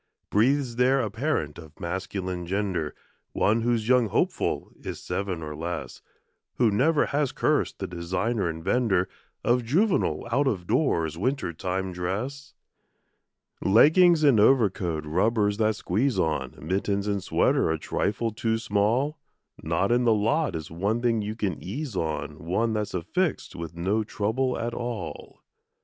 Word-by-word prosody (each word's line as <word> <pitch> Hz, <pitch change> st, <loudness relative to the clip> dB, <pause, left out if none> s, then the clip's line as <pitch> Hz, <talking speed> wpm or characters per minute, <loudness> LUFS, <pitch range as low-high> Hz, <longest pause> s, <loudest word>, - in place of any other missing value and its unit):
Breathes 125 Hz, +2 st, +2 dB
there 130 Hz, +2 st, +4 dB
a 110 Hz, -5 st, -1 dB
parent 115 Hz, -, -2 dB
of 80 Hz, -1 st, -14 dB
masculine 90 Hz, 0 st, -4 dB
gender, 95 Hz, -5 st, -1 dB, 0.4 s
One 110 Hz, +3 st, +2 dB
whose 115 Hz, -2 st, 0 dB
young 125 Hz, -2 st, +4 dB
hopeful -, -, -1 dB
is -, -, -5 dB
seven 95 Hz, -4 st, -3 dB
or 75 Hz, -1 st, -6 dB
less, 85 Hz, +2 st, -5 dB, 0.5 s
Who 120 Hz, -3 st, +3 dB
never 145 Hz, +9 st, +3 dB
has 145 Hz, -2 st, 0 dB
cursed -, -, 0 dB
the -, -, -4 dB
designer 90 Hz, +4 st, -1 dB
and 80 Hz, 0 st, -6 dB
vender 95 Hz, -5 st, +2 dB, 0.4 s
Of 120 Hz, +1 st, +2 dB
juvenile 145 Hz, -, +1 dB
out 140 Hz, +4 st, +2 dB
of 95 Hz, -9 st, -1 dB
doors 85 Hz, -, +1 dB
winter 130 Hz, -5 st, -1 dB
time 95 Hz, +3 st, -3 dB
dress? 110 Hz, +11 st, -4 dB, 1.1 s
Leggings 155 Hz, -, +6 dB
and 135 Hz, -7 st, +5 dB
overcoat, 95 Hz, -, +3 dB
rubbers 105 Hz, +5 st, +1 dB
that 110 Hz, -1 st, +2 dB
squeeze 115 Hz, +8 st, 0 dB
on, 75 Hz, -5 st, -1 dB
Mittens 100 Hz, +4 st, -1 dB
and 100 Hz, -2 st, -1 dB
sweater 95 Hz, -, +2 dB
a 80 Hz, -, +1 dB
trifle 105 Hz, +7 st, -1 dB
too 110 Hz, +1 st, -1 dB
small; 115 Hz, +8 st, 0 dB, 0.4 s
Not 85 Hz, +6 st, 0 dB
in 120 Hz, +1 st, +3 dB
the 115 Hz, -2 st, +5 dB
lot 115 Hz, -, +1 dB
is 80 Hz, -1 st, -6 dB
one 100 Hz, +8 st, -1 dB
thing 115 Hz, -2 st, +2 dB
you 105 Hz, +1 st, -4 dB
can 100 Hz, -8 st, -2 dB
ease 125 Hz, -, -5 dB
on, 80 Hz, -3 st, -3 dB
One 110 Hz, +7 st, 0 dB
that's 105 Hz, -3 st, -2 dB
affixed 165 Hz, -, -1 dB
with 85 Hz, -1 st, -7 dB
no 95 Hz, +6 st, 0 dB
trouble 115 Hz, +5 st, -1 dB
at 120 Hz, 0 st, -3 dB
all. 120 Hz, -2 st, -6 dB
105 Hz, 150 wpm, -26 LUFS, 90-120 Hz, 1.1 s, Leggings